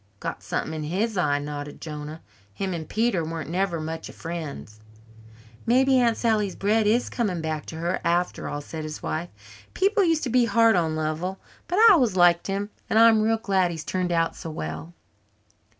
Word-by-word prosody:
"Got -, -, -5 dB
something 160 Hz, -, -3 dB
in 155 Hz, -, -4 dB
his 205 Hz, +8 st, -1 dB
eye," 150 Hz, -6 st, +2 dB
nodded 145 Hz, 0 st, -6 dB
Jonah. 150 Hz, 0 st, -7 dB, 0.3 s
"Him 190 Hz, -2 st, -2 dB
and 160 Hz, -3 st, -6 dB
Peter 220 Hz, -6 st, +1 dB
weren't 160 Hz, -1 st, -5 dB
never 180 Hz, -2 st, 0 dB
much 160 Hz, +1 st, -5 dB
of -, -, -12 dB
friends." 155 Hz, -10 st, -7 dB, 0.9 s
"Maybe 260 Hz, +2 st, +4 dB
Aunt 235 Hz, -2 st, +2 dB
Sally's 215 Hz, -5 st, +1 dB
bread 210 Hz, +2 st, +1 dB
is 235 Hz, +4 st, +2 dB
coming 205 Hz, -8 st, -2 dB
back 155 Hz, -2 st, -4 dB
to -, -, -7 dB
her 170 Hz, +3 st, -2 dB
after 175 Hz, +1 st, 0 dB
all," 145 Hz, -, -4 dB
said 155 Hz, +2 st, -7 dB
his 155 Hz, -1 st, -7 dB
wife. 170 Hz, +2 st, -3 dB, 0.5 s
"People 400 Hz, +2 st, +3 dB
used 325 Hz, -3 st, +2 dB
to 255 Hz, -, -1 dB
be 245 Hz, 0 st, +4 dB
hard 230 Hz, 0 st, +4 dB
on 160 Hz, -3 st, +1 dB
Lovell. 155 Hz, +5 st, -2 dB, 0.3 s
But 355 Hz, -, -1 dB
I 455 Hz, +2 st, +8 dB
always 250 Hz, -, +3 dB
liked 175 Hz, -1 st, +4 dB
him 200 Hz, +1 st, -3 dB, 0.2 s
and -, -, +2 dB
I'm 225 Hz, -1 st, +6 dB
real 225 Hz, +1 st, +2 dB
glad 195 Hz, -5 st, +1 dB
he's 160 Hz, -2 st, -6 dB
turned 185 Hz, -1 st, -1 dB
out 165 Hz, -1 st, +1 dB
so 165 Hz, -, -7 dB
well." 155 Hz, -, -6 dB
180 Hz, 190 wpm, -25 LUFS, 160-225 Hz, 0.9 s, I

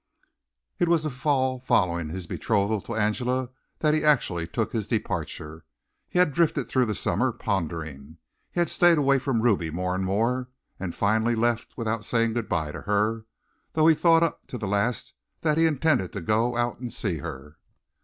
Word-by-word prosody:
It 175 Hz, -, +3 dB
was 165 Hz, -2 st, +3 dB
the 155 Hz, -, -2 dB
fall 130 Hz, -1 st, 0 dB
following 85 Hz, -9 st, +1 dB
his 90 Hz, +2 st, -5 dB
betrothal 105 Hz, +3 st, 0 dB
to 115 Hz, -, -6 dB
Angela 125 Hz, +4 st, 0 dB, 0.3 s
that 150 Hz, -1 st, +3 dB
he 155 Hz, -, +1 dB
actually 100 Hz, -, +2 dB
took 110 Hz, +5 st, -2 dB
his 110 Hz, -4 st, -2 dB
departure. 80 Hz, -7 st, -3 dB, 0.5 s
He -, -, -3 dB
had 180 Hz, -5 st, +4 dB
drifted 155 Hz, -6 st, +1 dB
through 125 Hz, -1 st, +2 dB
the 105 Hz, -, -1 dB
summer, 130 Hz, 0 st, +1 dB
pondering. 80 Hz, -8 st, -4 dB, 0.3 s
He -, -, -3 dB
had 175 Hz, -, +2 dB
stayed 175 Hz, -2 st, +5 dB
away 140 Hz, -2 st, +3 dB
from 130 Hz, -4 st, -1 dB
Ruby 100 Hz, -9 st, +2 dB
more 90 Hz, +3 st, -2 dB
and 95 Hz, +1 st, -1 dB
more, 115 Hz, +7 st, 0 dB, 0.3 s
and 95 Hz, -3 st, -4 dB
finally 110 Hz, +3 st, +2 dB
left 120 Hz, 0 st, -1 dB
without 115 Hz, -2 st, -2 dB
saying 115 Hz, +1 st, +1 dB
good 115 Hz, -2 st, -3 dB
bye 80 Hz, -4 st, -1 dB
to -, -, -7 dB
her, 105 Hz, +2 st, 0 dB, 0.5 s
though 155 Hz, 0 st, +3 dB
he 165 Hz, -, +7 dB
thought 165 Hz, +1 st, +4 dB
up 165 Hz, -, -2 dB
to 125 Hz, -, -5 dB
the 105 Hz, -, -4 dB
last 100 Hz, +4 st, -1 dB, 0.3 s
that 155 Hz, -1 st, +1 dB
he 165 Hz, -, +5 dB
intended 150 Hz, -, +1 dB
to 100 Hz, -, -4 dB
go 115 Hz, +6 st, +1 dB
out 120 Hz, 0 st, -1 dB
and 125 Hz, -2 st, -5 dB
see 95 Hz, -7 st, -2 dB
her. 75 Hz, -2 st, -8 dB
115 Hz, 185 wpm, -26 LUFS, 95-130 Hz, 0.5 s, he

